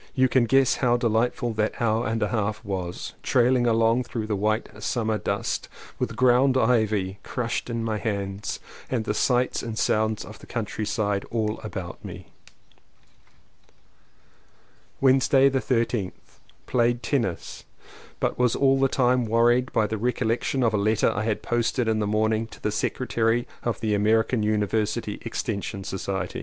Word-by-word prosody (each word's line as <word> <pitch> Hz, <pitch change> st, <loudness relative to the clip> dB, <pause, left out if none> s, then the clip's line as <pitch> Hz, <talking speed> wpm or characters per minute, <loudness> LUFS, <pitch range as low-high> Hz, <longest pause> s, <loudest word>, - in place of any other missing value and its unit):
You 130 Hz, 0 st, +4 dB
can 130 Hz, -1 st, +3 dB
guess 135 Hz, +2 st, +3 dB
how 120 Hz, -2 st, +2 dB
delightful 120 Hz, 0 st, 0 dB
that 105 Hz, 0 st, -1 dB
hour 115 Hz, 0 st, +1 dB
and 110 Hz, -1 st, 0 dB
a 105 Hz, -, 0 dB
half 110 Hz, 0 st, -2 dB
was; 90 Hz, -3 st, -4 dB
trailing 125 Hz, 0 st, +3 dB
along 115 Hz, +2 st, +3 dB
through 115 Hz, -4 st, -4 dB
the 110 Hz, -1 st, -1 dB
white 110 Hz, +1 st, -1 dB
summer 110 Hz, -2 st, -1 dB
dust, -, -, -2 dB, 0.3 s
with -, -, -2 dB
ground 130 Hz, +1 st, +4 dB
ivy 110 Hz, -6 st, +1 dB
crushed 120 Hz, 0 st, -3 dB
in 115 Hz, -1 st, -2 dB
my 110 Hz, -2 st, -1 dB
hands 100 Hz, -2 st, -3 dB, 0.3 s
and 120 Hz, -4 st, -1 dB
the 105 Hz, -, 0 dB
sights 125 Hz, +3 st, +1 dB
and 115 Hz, -2 st, -5 dB
sounds 110 Hz, -1 st, +1 dB
of 105 Hz, 0 st, -11 dB
the -, -, -14 dB
countryside 105 Hz, -2 st, -2 dB
all 110 Hz, -2 st, -1 dB
about 95 Hz, -5 st, -7 dB
me. -, -, -8 dB, 2.7 s
Wednesday 135 Hz, +1 st, +5 dB
the 135 Hz, 0 st, 0 dB
13th. 115 Hz, -6 st, 0 dB, 0.5 s
Played 120 Hz, 0 st, +1 dB
tennis, 115 Hz, -, -2 dB, 0.6 s
but -, -, -1 dB
was 125 Hz, -2 st, +3 dB
all 135 Hz, -1 st, +3 dB
the 135 Hz, -, +4 dB
time 125 Hz, -2 st, +2 dB
wor 115 Hz, +2 st, +4 dB
ried 125 Hz, +1 st, +1 dB
by 110 Hz, -, +2 dB
the 110 Hz, 0 st, -3 dB
recollection 125 Hz, +2 st, 0 dB
of 115 Hz, -2 st, +2 dB
a -, -, +2 dB
letter 105 Hz, +1 st, +2 dB
I 105 Hz, +2 st, -2 dB
had 110 Hz, -2 st, -1 dB
post 120 Hz, +1 st, 0 dB
ed 120 Hz, -, +1 dB
in 110 Hz, -1 st, +1 dB
the 105 Hz, -, 0 dB
morning 110 Hz, +1 st, +1 dB
to -, -, -14 dB
the 105 Hz, -, -1 dB
secretary 115 Hz, +1 st, 0 dB
of 120 Hz, -, -2 dB
the 110 Hz, -2 st, 0 dB
American 110 Hz, +3 st, +2 dB
University 105 Hz, +1 st, -1 dB
Extension 100 Hz, -3 st, -4 dB
Society. 95 Hz, -1 st, -4 dB
115 Hz, 160 wpm, -25 LUFS, 105-120 Hz, 2.7 s, Wednesday